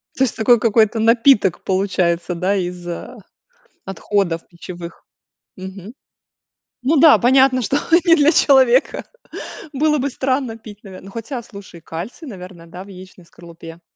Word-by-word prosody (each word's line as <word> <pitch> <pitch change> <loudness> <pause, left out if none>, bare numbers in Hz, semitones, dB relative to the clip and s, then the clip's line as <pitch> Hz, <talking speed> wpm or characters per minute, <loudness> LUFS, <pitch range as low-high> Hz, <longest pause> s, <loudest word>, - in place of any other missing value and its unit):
То 265 - +1
есть, 250 - -1
такой 230 +1 +3
какой-то 220 0 +2
напиток 230 -4 +3
получается, 180 -2 -1
да, 185 +4 -1
из, 180 -1 -5
а, 170 - -7 0.7
отходов 195 -3 -2
пищевых? 170 -1 -11 0.5
Мгм. 190 +3 -10 0.9
Ну 300 +4 +2
да, 315 0 +7
понятно, 260 +1 +3
что 275 +5 -1 0.3
не 335 -1 +6
для 300 0 +4
человека. 265 -4 +3 0.7
Было 300 +2 +1
бы 280 +1 -2
странно 255 -3 -2
пить, 210 -2 -14
наверно 190 -1 -12
ну, 195 - -12
хотя, 235 +3 -6
слушай, 200 -6 -13
кальций, 195 - -8
наверное, 180 -5 -11
да, 180 +3 -10
в - - -17
яичной 185 -2 -14
скорлупе. 170 0 -14
200 Hz, 140 wpm, -18 LUFS, 180-255 Hz, 0.9 s, да